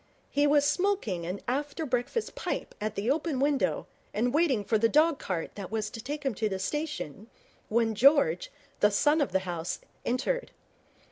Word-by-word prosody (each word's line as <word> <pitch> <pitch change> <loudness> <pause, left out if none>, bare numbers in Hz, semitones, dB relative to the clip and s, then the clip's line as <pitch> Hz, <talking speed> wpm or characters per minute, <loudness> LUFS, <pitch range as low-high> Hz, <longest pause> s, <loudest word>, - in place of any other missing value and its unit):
He 290 +1 +3
was 290 0 +4
smoking 295 - 0
an 185 +3 -4
after 290 +5 -2
breakfast 255 - -1
pipe - - -4
at 215 0 -2
the 215 +6 0
open 305 -2 0
window 280 0 +1 0.3
and 245 +4 +1
waiting 290 -9 +3
for 215 +2 +1
the 230 +1 +4
dog 310 +2 +4
cart 175 -4 -3
that 195 -3 -7
was 215 -1 -2
to 225 - -7
take 290 +3 -4
him 270 -3 0
to 215 +1 -1
the 190 - -2
station, 230 - -4 0.4
when 225 0 +2
George, 230 - +4 0.3
the 210 - +5
son 295 +9 +3
of 285 - 0
the 190 - +2
house, 175 -1 -3 0.3
entered. - - -1
245 Hz, 180 wpm, -29 LUFS, 210-295 Hz, 0.4 s, the